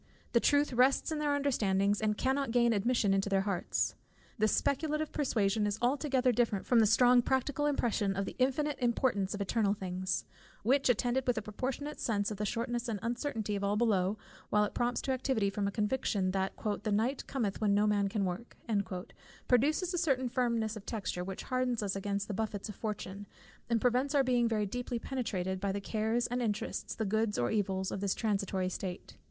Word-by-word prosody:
The 235 - +4
truth 285 +2 +3
rests 260 +6 +3
in 310 - -1
their 295 -1 +1
understandings, 205 -8 +1
and 210 -1 +1
cannot 270 +1 0
gain 235 0 +3
admission 215 -1 +2
into 195 +1 +1
their 195 -1 +3
hearts. 195 -3 -1 0.5
This 215 0 +3
speculative 305 +2 0
persuasion 215 -7 +1
is 205 0 -1
altogether 260 0 +2
different 225 -4 0
from 245 - +4
that 220 - +5
strong 245 +3 +6
practical 265 +4 0
impression 220 -8 0
of 195 +1 -1
the - - -6
infinite 275 +3 +1
importance 235 -5 +1
of 205 - -5
eternal 200 0 +1
things, 185 -1 -3 0.4
which 265 +4 +3
attended 245 +2 +1
with 245 -1 +2
a - - 0
proportionate 265 +8 -4
sense 205 -2 0
of 210 - -4
the 210 +1 -1
shortness 240 +2 -2
and 225 -3 -2
uncertainty 230 -3 -2
of 200 - -3
all 200 +1 +1
below, 210 -3 +2 0.3
while 210 0 +3
it 210 - -2
prompts 240 0 0
to 270 - -1
activity 255 -6 0
from 200 0 -1
a - - -1
conviction 210 -3 0
that 190 0 -1 0.3
"the 215 - -2
night 230 +6 0
cometh 225 -8 -2
when 205 -2 +3
no 205 +1 +3
man 205 -1 +2
can 200 0 -1
work," 185 +6 -5 0.9
produces 305 - +2
a 355 - 0
certain 270 -7 +1
firmness 235 -3 0
of 215 - -8
texture, 195 -5 -3
which 190 +1 -6
hardens 255 -3 -1
us 195 -1 -1
against 200 0 -2
the 210 - -3
buffets 210 -1 -3
of 210 - -7
fortune, 205 -2 -5 0.4
and 230 -1 +2
prevents 255 +5 +1
our 275 - +5
being 245 -2 +2
very 215 -2 0
deeply 245 +3 -3
penetrated 190 -8 -3
by 200 0 -1
the 200 - -2
cares 220 +3 0
and 245 +1 -1
interests, 215 -3 -2
the 220 - -2
goods 220 +1 0
or 120 - +1
evils, 190 -3 0
of - - -3
this 200 -2 0
transitory 195 -4 -1
state. 185 0 -5
220 Hz, 195 wpm, -32 LUFS, 200-255 Hz, 0.9 s, strong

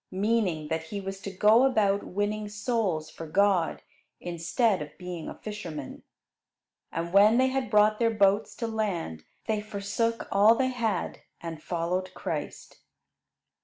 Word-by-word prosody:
Meaning 190 -6 0
that 160 0 -2
he 200 +5 -5
was 195 0 -6
to 200 - -5
go 210 +5 +5
about 205 -6 +3
winning 205 +2 -2
souls 205 -7 -1
for 165 - -8
God, 190 0 +2 0.4
instead 175 +4 0
of 150 0 -8
being 180 -3 -6
a - - -8
fisherman. 170 -10 -7 0.9
And 170 +1 -4
when 210 +3 +6
they 260 +1 +4
had 265 -1 -2
brought 210 0 +4
their 230 -1 +3
boats 205 -1 +2
to 230 - -3
land, 190 - -3 0.2
they 215 -1 0
forsook 215 +2 -2
all 210 +3 +6
they 260 +1 +1
had 230 -6 -2 0.2
and 165 -2 -7
followed 180 +3 -2
Christ. - - -5
200 Hz, 145 wpm, -28 LUFS, 175-220 Hz, 0.9 s, when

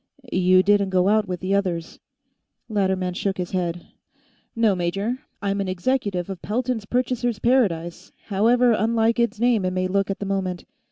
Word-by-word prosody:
"You 185 0 +4
didn't 200 -1 +3
go 185 0 +2
out 215 0 +2
with 180 -2 -4
the 190 +1 -1
others." 180 -4 -2 0.7
Latterman 190 -4 0
shook 195 +2 -2
his 180 -1 -4
head. 175 -2 -2 0.7
"No, 225 -3 +3
major; 195 +7 -2 0.2
I'm 200 0 0
an 195 - -3
executive 185 -1 -1
of 195 -2 -7
Pelton's 235 0 -2
Purchasers' 245 0 -1
Paradise, 195 -9 0 0.2
however 235 +5 +3
unlike 225 +1 +2
its 235 -2 0
name 235 -4 +2
it 185 0 -1
may 185 0 0
look 195 +1 0
at 195 - -2
the 205 - -5
moment. 190 -2 -2
200 Hz, 165 wpm, -23 LUFS, 185-225 Hz, 0.7 s, You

